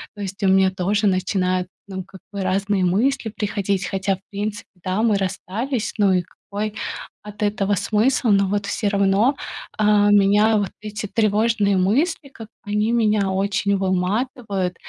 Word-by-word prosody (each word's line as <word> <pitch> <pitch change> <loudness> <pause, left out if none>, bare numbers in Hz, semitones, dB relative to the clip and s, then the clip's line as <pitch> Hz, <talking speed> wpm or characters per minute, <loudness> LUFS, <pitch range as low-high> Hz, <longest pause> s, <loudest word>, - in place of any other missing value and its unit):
То 205 - -8
есть 195 0 -5
у - - +4
меня 190 0 +5
тоже 200 +3 0
начинают, 185 -1 0 0.2
ну, 190 -1 -5
как 190 0 -14
бы, 200 -1 -4
разные 195 0 +1
мысли 225 +6 +1
приходить, 200 -2 -1
хотя 195 -1 -1
в - - -30
принципе, 205 +1 -4
да, 185 +3 -1
мы 220 -3 +3
расстались. 215 +6 -3
Ну 200 -2 +4
и 180 - +3
какой 205 +4 -6 0.5
от 210 0 -6
этого 205 -1 +1
смысл? 230 +4 +1
Но 200 -1 +4
вот 200 0 -1
всё 200 +1 -1
равно, 200 +6 +2 0.4
а, 210 -1 +4
меня 205 +2 +4
вот 200 -3 -1
эти 210 0 -5
тревожные 215 -1 +2
мысли, 275 - +1
как 225 -5 -11
бы 210 -2 -12
они 210 +2 +1
меня 210 -4 +2
очень 200 +1 0
выматывают. 190 0 -1
205 Hz, 160 wpm, -22 LUFS, 190-215 Hz, 0.5 s, меня